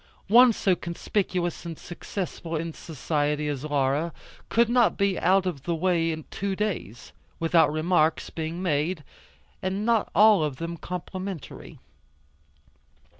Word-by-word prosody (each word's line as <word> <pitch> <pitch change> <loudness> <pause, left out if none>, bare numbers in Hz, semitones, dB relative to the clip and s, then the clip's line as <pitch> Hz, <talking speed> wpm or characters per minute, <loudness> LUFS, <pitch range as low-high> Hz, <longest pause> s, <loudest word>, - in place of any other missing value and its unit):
One 245 +3 +8
so 195 -4 +1
conspicuous 175 0 -2
and 165 -2 -6
successful 175 -2 -5
in 165 +1 -3
society 150 -1 -2
as 145 -2 -3
Laura 145 +2 0 0.4
could 235 0 +3
not 240 0 +3
be 200 -2 +1
out 190 +1 +3
of 170 -7 -3
the 170 +4 -2
way 165 -1 +1 0.2
two 195 0 -2
days, 190 - -4 0.3
without 165 -2 +4
remarks 155 0 +1
being 165 +3 -4
made, 155 0 0 0.6
and 190 +3 -2
not 230 -2 +2
all 210 -5 +6
of 150 -3 -2
them 165 +4 -5
complimentary. 180 0 -7
170 Hz, 125 wpm, -26 LUFS, 155-190 Hz, 0.6 s, One